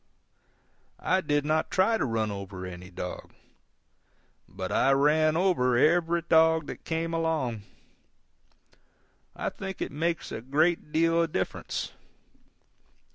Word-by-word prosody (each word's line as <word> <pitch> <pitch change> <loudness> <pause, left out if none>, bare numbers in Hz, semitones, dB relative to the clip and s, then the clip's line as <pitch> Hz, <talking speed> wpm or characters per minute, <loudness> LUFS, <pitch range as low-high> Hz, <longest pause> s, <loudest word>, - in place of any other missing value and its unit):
I 185 +1 +1
did 145 -3 0
not 155 +1 +1
try 220 +4 +2
to - - +1
run 110 -3 -1
over 100 -2 -7
any 90 0 -9
dog. 90 -1 -7 1.1
But 95 +1 -5
I 135 - +3
ran 155 +3 +3
over 145 -10 +2
every 170 +4 +3
dog 160 -1 +4
that - - -9
came 165 0 -2
along. 155 -9 -1 1.7
I - - -2
think 190 -1 -7
it - - -3
makes 165 +3 -2
a 110 - -5
great 150 +5 +1
deal 165 +1 +3
of 165 -1 -1
difference. - - -3
155 Hz, 125 wpm, -28 LUFS, 120-165 Hz, 1.7 s, dog